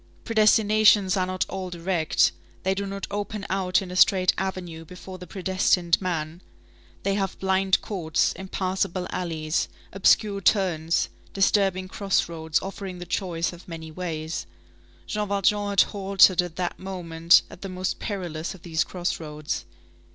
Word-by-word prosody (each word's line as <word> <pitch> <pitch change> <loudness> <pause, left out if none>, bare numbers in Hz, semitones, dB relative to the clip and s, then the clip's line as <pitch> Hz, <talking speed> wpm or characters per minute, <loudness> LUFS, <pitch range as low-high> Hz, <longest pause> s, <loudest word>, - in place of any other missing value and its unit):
Predestinations 215 -3 +4
are 185 -1 0
not 185 0 -1
all 190 -1 -5
direct; 170 - +1 0.3
they 190 - +2
do 200 +1 -3
not 195 0 -4
open 205 0 -4
out 190 0 +1
in 180 - -8
a - - -6
straight 185 0 +5
avenue 180 -4 -4
before 185 +2 -10
the 180 - -9
predestined 185 -2 +1
man; 165 -2 -3 0.6
they 195 - +1
have 195 -2 -2
blind 190 0 +2
courts, 170 -7 0
impassable 185 -1 -2
alleys, 160 -3 -2 0.2
obscure 200 +1 +3
turns, 175 -5 +2 0.2
disturbing 195 -1 +2
crossroads 170 -5 0
offering 195 -1 -6
the 175 - -7
choice 175 -2 -2
of 175 - -13
many 160 -2 -7
ways. 160 -2 -4 0.6
Jean 210 -1 -2
Valjean 205 +1 +1
had 200 -1 +5
halted 195 -3 +4
at 175 -2 -7
that 180 -1 -3
moment 170 -3 +3
at - - -12
the 195 - -5
most 185 0 -3
perilous 175 -4 -4
of 175 - -17
these 165 -1 0
crossroads. 155 -4 -4
185 Hz, 145 wpm, -25 LUFS, 170-195 Hz, 0.6 s, straight